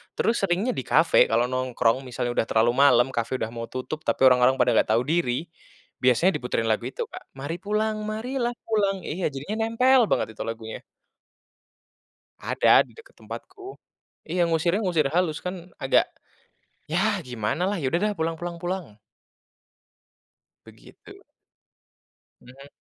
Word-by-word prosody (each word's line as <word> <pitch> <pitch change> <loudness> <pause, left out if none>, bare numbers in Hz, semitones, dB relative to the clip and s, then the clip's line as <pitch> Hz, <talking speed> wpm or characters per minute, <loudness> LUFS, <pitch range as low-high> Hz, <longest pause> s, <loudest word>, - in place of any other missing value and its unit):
Terus 230 +1 +1
seringnya 195 +6 0
di 130 - -4
cafe 160 +6 +4
kalau 115 +2 +2
nongkrong 130 -2 +1
misalnya 120 0 -3
udah 115 - 0
terlalu 115 +1 +3
malam, 125 -3 +5
cafe 115 +1 -2
udah 110 -3 -3
mau 115 0 -6
tutup 130 +4 -5
tapi - - 0
orang-orang 125 0 +6
pada 125 -1 +2
nggak - - +2
tahu 120 - +2
diri. 155 -5 0 0.6
Biasanya 130 +9 +4
diputerin 125 -2 -2
lagu 110 - 0
itu, - - -4
Kak, - - -9 0.2
Mari 145 +5 -4
pulang, 215 +1 0 0.2
marilah 240 +3 -2 0.2
pulang. 205 -3 +1
Iya, 175 +4 -4
jadinya 145 +10 -5
nempel 255 +3 +4
banget - - +2
itu - - -5
lagunya. 115 -1 -6 1.6
Ada - - +4
di - - -21
dekat 455 - -17
tempatku. 385 +1 -9 0.5
Iya 170 +1 0
ngusirnya 170 +4 +1
ngusir 160 -7 +1
halus 165 -2 0
kan 180 -1 -6
agak 135 - +2 0.8
ya 195 +4 +1
gimanalah, 135 - -2
ya 145 -6 -2
udah 170 - +3
deh - - -2
pulang 165 +1 -1
pulang 175 +1 -6
pulang. 175 - -5 1.7
Begitu. - - -16 1.2
Mhm. 135 +3 -15
160 Hz, 145 wpm, -25 LUFS, 125-190 Hz, 1.7 s, orang-orang